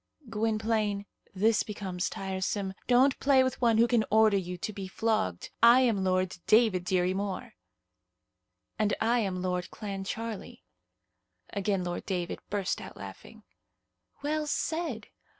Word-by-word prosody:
"Gwynplaine, 215 -2 0 0.3
this 215 +4 +3
becomes 190 -4 -3
tiresome. 190 0 -3
Don't 260 +2 +4
play 270 -1 +5
with 260 0 -2
one 230 -2 +4
who 230 - +6
can 235 -2 +3
order 220 -1 +5
you 180 -2 -2
to 215 +5 -4
be 195 -1 -6
flogged. 185 - -1
I 235 +2 +8
am 225 -7 +2
Lord 185 -1 0
David 215 -5 +4
Dirry 185 0 +1
Moir." 195 -1 -4 1.3
"And 210 -1 +2
I 235 +2 +2
am 185 -4 -2
Lord 180 -1 -2
Clancharlie." 210 +2 -6 0.9
Again 195 -1 0
Lord 175 0 -4
David 180 -3 -2
burst 200 -2 -1
out - - -10
laughing. - - -11 0.8
"Well 305 +1 -1
said! 305 -7 -2
205 Hz, 130 wpm, -29 LUFS, 190-230 Hz, 1.3 s, I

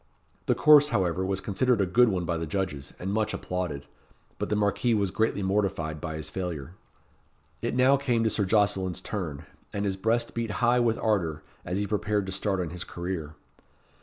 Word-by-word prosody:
The - - +3
course, 150 -1 +7
however, 95 - 0
was 95 0 -1
considered 120 +4 +1
a 100 - +3
good 120 +6 +4
one 90 -3 -1
by 85 0 -1
the 80 0 -3
judges, 75 -5 -3
and 95 +2 -3
much 110 0 0
applauded; 85 -6 -4 0.5
but - - -2
the 105 - +1
Marquis 105 +3 +2
was 100 -3 0
greatly 110 -1 0
mortified 95 -6 -1
by 80 -2 -4
his 80 - -5
failure. 85 -4 -5 0.9
It - - -2
now 130 +2 +5
came 125 -5 +1
to 110 - +3
Sir 100 - +1
Jocelyn's 95 -3 +1
turn, 85 -7 -5 0.3
and 100 0 -2
his 95 -1 -1
breast 115 +4 0
beat 115 -1 -2 0.2
high 120 +1 +4
with 115 -2 +2
ardour, 85 -8 0 0.2
as 90 - -3
he 105 - 0
prepared 105 0 0
to 95 - -5
start 95 0 -1
on 85 -3 -2
his 90 0 -5
career. 85 -3 -5
95 Hz, 190 wpm, -27 LUFS, 90-110 Hz, 0.9 s, course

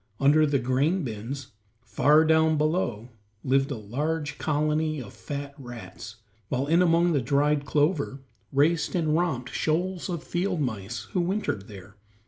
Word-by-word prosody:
Under 150 +3 +5
the 140 -1 +2
grain 140 +8 +1
bins, 120 +3 -6 0.3
far 145 +8 +4
down 160 0 +4
below, 150 - -1 0.3
lived 135 +1 +2
a 140 - -3
large 145 +8 -3
colony 155 0 0
of 115 -6 -9
fat 140 -1 -6
rats, 120 -2 -9 0.3
while 130 +1 0
in 165 +4 +3
among 170 0 +3
the 140 - +2
dried 145 +3 +1
clover 145 -2 +1 0.3
raced 150 +4 +2
and 160 -3 +1
romped 150 -8 -1
shoals 180 +4 -1
of 170 -3 -3
field 180 0 -1
mice 115 -5 -3
who 180 - +1
wintered 175 - -2
there. 100 0 -12
145 Hz, 145 wpm, -26 LUFS, 125-160 Hz, 0.3 s, Under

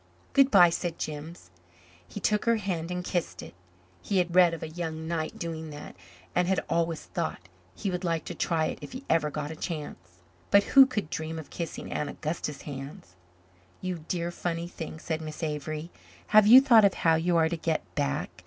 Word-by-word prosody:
"Good 275 -1 +5
bye," 180 -7 +7
said 170 0 -3
Jims. 150 - -7 0.6
He - - -7
took 210 -1 +1
her 230 0 +4
hand 180 -6 -3
and 180 0 -3
kissed 165 - -3
it. - - -11 0.5
He 200 - -1
had 175 -2 +1
read 180 -2 +7
of 165 -1 -6
a - - -3
young 160 -1 -5
knight 160 -2 -3
doing 160 -2 -5
that 145 0 -9 0.4
and 180 0 +2
had 190 0 0
always 165 -1 0
thought 90 - -4 0.3
he 195 - -3
would 180 +1 -3
like 165 -3 -1
to - - -5
try 160 -2 0
it - - -4
if - - -9
he 260 +2 -8
ever 160 -2 +2
got 150 0 -4
a - - -6
chance. 90 - -7 0.3
But 200 0 +6
who 270 +3 +7
could 210 - -3
dream 160 +1 -4
of 160 - -9
kissing 170 -2 -5
Aunt 150 - -2
Augusta's 150 -2 -4
hands? 135 - -8 0.7
"You 180 -4 -4
dear, 175 -1 -2
funny 170 -1 -3
thing," 165 -2 -7
said 160 0 -3
Miss 155 +1 -7
Avery. 155 +2 -4 0.4
"Have 215 -1 +6
you 250 +4 +10
thought 235 -6 +6
of 200 -1 +4
how 165 - +3
you 170 +2 +2
are 160 -1 +4
to 170 - -2
get 160 -1 -1
back? 145 -2 -1
165 Hz, 200 wpm, -28 LUFS, 155-180 Hz, 0.7 s, you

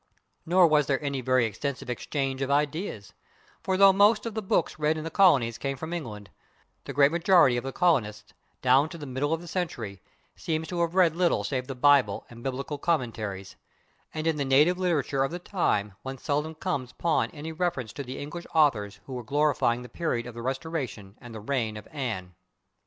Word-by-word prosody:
Nor 180 +1 +6
was 150 -3 +3
there 135 -2 +1
any 140 -2 -2
very 130 -1 +2
extensive 130 +5 -4
exchange 135 +2 -3
of 135 - -1
ideas, 145 - -1 0.5
for 190 -1 0
though 195 0 +7
most 205 +4 +4
of 230 - -4
the 220 - -2
books 180 -5 0
read 155 +1 +1
in 155 - -4
the 165 - -5
colonies 135 - +4
came 135 -1 -3
from 160 +5 -6
England, 105 - -6 0.5
the - - -5
great 140 +1 +5
majority 170 -6 +5
of 120 - -2
the 135 - -4
colonists, 120 - 0 0.3
down 130 +4 +4
to 170 - -8
the 150 - -8
middle 135 +3 -2
of 165 0 0
the 175 - -11
century, 120 - -4 0.3
seem 160 -1 -2
to 170 +1 -3
have 170 +1 -1
read 175 -4 +4
little 170 - +2
save 125 +3 -2
the 135 - -5
Bible 140 +1 +3
and 120 0 -11
biblical 135 +3 -4
commentaries, 110 - -2 0.6
and 155 0 -4
in 160 -2 +1
the 145 - 0
native 150 +7 +4
literature 150 -7 +1
of 135 - 0
the 175 - -5
time 105 - -1
one 135 0 -6
seldom 150 +3 -2
comes 135 -5 -3
upon 170 -2 0
any 155 +2 -7
reference 160 -9 -2
to - - -5
the 130 0 -7
English 170 +4 -7
authors 115 -11 +2
who 135 - -8
were 125 -1 -5
glorifying 140 -2 +1
the - - -9
period 120 -3 -2
of 120 - -8
the 115 - -7
Restoration 130 -6 -4
and 120 -3 -10
the - - -6
reign 110 -2 -2
of 105 - -10
Anne. 110 -11 -4
140 Hz, 200 wpm, -27 LUFS, 125-165 Hz, 0.6 s, though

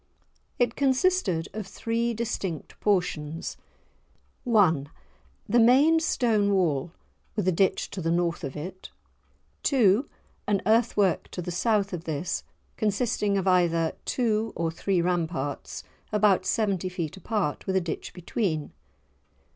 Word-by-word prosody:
It 245 -1 +1
consisted 265 - +1
of 215 -2 -5
three 230 +3 -1
distinct 195 -7 -4
portions:— 165 -6 -1 0.9
1. 175 - +3 0.6
The 240 +4 +3
main 275 +8 +6
stone 225 -10 +2
wall, 165 -4 +1 0.4
with 205 -4 -1
a - - +5
ditch 190 +2 +1
to 190 - -5
the 165 - -1
north 170 +1 0
of 135 -2 -5
it. 185 +5 -7 0.7
2. 250 -1 +3 0.4
An 205 -1 +2
earth 225 +2 +3
work 195 -4 +2
to 180 - -5
the 180 - -4
south 200 +1 +1
of 170 -2 -5
this, 160 +2 -2 0.3
consisting 210 -1 0
of 195 - -1
either 170 -3 +3
two 225 -3 0
or 165 -1 -1
three 175 +2 0
ramparts 165 -6 -2 0.3
about 210 -3 +3
seventy 195 -5 0
feet 170 -4 -4
apart, 190 -5 -2
with 190 - 0
a - - +5
ditch 170 -3 -5
between. 175 -4 -2
190 Hz, 130 wpm, -27 LUFS, 170-225 Hz, 0.9 s, main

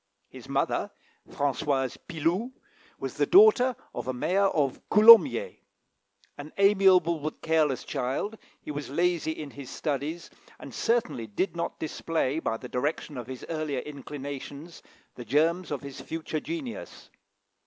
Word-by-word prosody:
His - - -13
mother, - - 0 0.4
Françoise 140 -2 -1
Piloux, 180 - -1 0.4
was - - -6
the - - +2
daughter 355 - +6 0.2
of - - -5
a 130 - -1
mayor 190 +10 +2
of 145 -8 0
Coulommiers. 230 - +7 0.8
An 145 +2 -8
amiable 190 -4 +4
but 155 +1 -6
careless 155 -5 +1
child, 140 - -3 0.2
he - - -7
was 145 -2 -5
lazy 170 +2 0
in 150 -3 -7
his 140 -2 -10
studies, 150 +3 -4 0.3
and - - -11
certainly 230 - 0
did 170 - -2
not 170 - -3
display, 160 -2 -2
by 115 -8 -2
the 125 - -9
direction 145 +4 -3
of 125 -2 -6
his 130 -1 -8
earlier 155 -5 -2
inclinations, 145 +2 -8 0.3
the 125 - -9
germs 160 - +1
of 145 - -3
his 140 -1 -8
future 160 -1 -4
genius. 300 - -7
155 Hz, 140 wpm, -27 LUFS, 140-185 Hz, 0.8 s, Coulommiers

